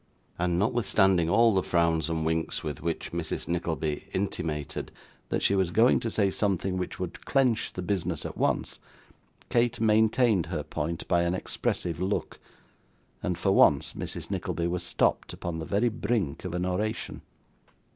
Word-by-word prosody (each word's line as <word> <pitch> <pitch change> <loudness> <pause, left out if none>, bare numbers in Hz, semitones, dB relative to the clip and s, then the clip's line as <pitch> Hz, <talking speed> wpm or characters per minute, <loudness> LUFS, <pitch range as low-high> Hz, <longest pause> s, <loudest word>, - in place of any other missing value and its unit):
And 85 -1 +1
notwithstanding 95 -5 +3
all 115 +4 +5
the 95 - +3
frowns 85 -2 +1
and 80 -1 -1
winks 80 0 -1
with 75 -4 -4
which 85 -1 -3
Mrs. - - -3
Nickleby 80 -3 -2
intimated 80 -7 -3 0.4
that - - -1
she - - +4
was 95 -3 +2
going 115 +8 +4
to 115 - -2
say 100 -3 +1
something 95 -2 0
which 90 -1 -4
would 90 -2 -5
clench 125 -5 +2
the 90 - -4
business 90 -4 -1
at - - -5
once, - - 0 0.7
Kate 120 0 +2
maintained 110 -3 +3
her 80 -3 -3
point 80 +2 -4
by 85 -1 +3
an 85 +1 +1
expressive 85 -2 -2
look, 95 +3 -2 0.8
and 90 -2 -1
for 95 +3 +1
once - - +4
Mrs. - - -5
Nickleby 85 - -2
was 90 +1 -1
stopped 85 - 0
upon 85 -1 -4
the 80 - -4
very 105 +5 +2
brink 105 -9 -2
of 90 -1 -3
an 90 0 -1
oration. 105 +5 -2
90 Hz, 160 wpm, -28 LUFS, 85-105 Hz, 0.8 s, all